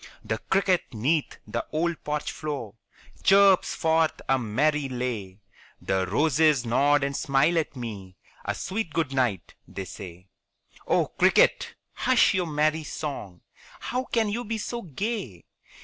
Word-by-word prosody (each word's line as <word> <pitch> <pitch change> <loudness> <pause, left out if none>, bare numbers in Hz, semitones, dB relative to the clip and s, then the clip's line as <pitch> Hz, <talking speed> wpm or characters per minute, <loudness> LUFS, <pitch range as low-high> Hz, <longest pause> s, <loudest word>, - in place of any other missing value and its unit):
The 110 - -2
cricket 190 -2 +2
'neath 145 +8 0
the - - -3
old 165 +1 -1
porch 150 0 -2
floor 140 -9 -5 0.5
Chirps 195 -1 +5
forth 160 0 +1
a 135 0 +3
merry 135 +6 0
lay; 115 -6 -4 0.4
The 95 -1 -1
roses 150 - +3
nod 140 +5 +3
and 140 0 -1
smile 140 +4 +2
at 155 - -4
me 105 -7 -7 0.3
"A - - -2
sweet 195 -4 -3
good 155 -5 -1
night," 120 - -1
they 95 - -6
say. 90 -1 -10 0.6
Oh, - - +3
cricket, - - +3 0.2
hush - - +3
your 185 -2 0
merry 155 +1 +1
song; 120 - -6 0.4
How 255 +2 -3
can 225 -3 +1
you 235 +4 -2
be 225 0 -3
so 235 +2 -4
gay? 190 - -4
145 Hz, 140 wpm, -26 LUFS, 115-170 Hz, 0.6 s, Chirps